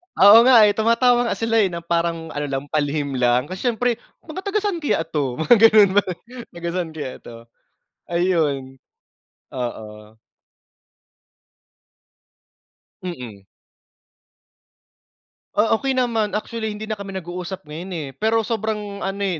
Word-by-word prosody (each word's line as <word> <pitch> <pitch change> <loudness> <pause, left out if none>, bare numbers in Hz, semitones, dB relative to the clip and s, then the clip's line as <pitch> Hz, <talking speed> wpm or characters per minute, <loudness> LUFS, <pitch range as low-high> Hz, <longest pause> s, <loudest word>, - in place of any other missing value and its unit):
Oo, 205 +3 +8
nga, 240 -4 +8
eh, 205 - +5
tumatawa 240 +2 +2
nga - - -1
sila, 225 0 +1
eh, 200 - +4
na 170 -1 -6
parang 170 -1 -2
ano 145 0 -3
lang, 135 0 -3
palihim 145 -2 -1
lang, 125 +1 +3
kasi 190 +7 -4
siyempre, 240 0 0 0.2
"Mga 330 +4 -7
taga-saan 405 -3 -1
kaya 285 - 0
ito?" 145 -6 -3
Mga 200 - +4
ganun 210 -3 +6
ba, - - +1 0.5
"Taga-saan 170 -1 -3
kaya 145 -4 -5
ito?" 115 - -12 0.7
Ayon. 155 -7 -1 0.7
Oo. 110 -4 -7 2.9
Mm. 120 - -8 2.1
Ah, 215 +2 +2
okey 270 -1 -1
naman. 225 -5 0
Actually 220 0 -3
hindi 210 - -8
na 215 - -2
kami 195 -1 -7
nag-uusap 180 +1 -6
ngayon, 165 +5 -8
eh, 150 -4 -4
pero 225 +3 +1
sobrang 210 -2 -3
ano, 195 +1 -4
eh, 180 -4 -1
185 Hz, 130 wpm, -21 LUFS, 150-220 Hz, 2.9 s, Oo